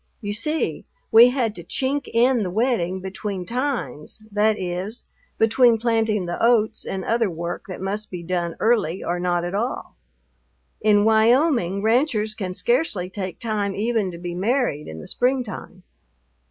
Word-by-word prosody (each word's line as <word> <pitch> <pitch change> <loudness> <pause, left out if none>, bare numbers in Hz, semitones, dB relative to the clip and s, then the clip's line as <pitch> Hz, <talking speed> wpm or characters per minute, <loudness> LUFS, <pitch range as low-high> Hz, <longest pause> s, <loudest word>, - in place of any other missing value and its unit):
You 205 -3 -4
see, 300 +9 -1 0.3
we 235 +2 +9
had 245 -4 0
to 170 - -8
chink 270 - -2
in 240 +1 +3
the 190 - -1
wedding 190 -4 0
between 190 0 -5
times, 250 - -3
that 210 +1 +2
is, 185 +5 -4 0.3
between 230 +1 +4
planting 220 -3 +1
the 175 +4 -3
oats 225 -2 +2
and 190 -1 -4
other 230 -2 +1
work 170 +2 -5
that 185 - -7
must 205 +3 -3
be 180 -2 -6
done 170 -1 -2
early 215 -7 +1
or 175 +1 -2
not 175 -1 0
at 175 - -4
all. 230 +6 -3 0.9
In 210 -1 +4
Wyoming 220 - +3
ranchers 220 -2 +2
can 185 -4 -5
scarcely 235 - 0
take 185 -3 -5
time 210 -3 -2
even 220 -2 0
to 170 - -8
be 175 0 -5
married 200 - 0
in 80 - -8
the - - -10
springtime. 245 -7 -2
210 Hz, 155 wpm, -23 LUFS, 185-235 Hz, 0.9 s, we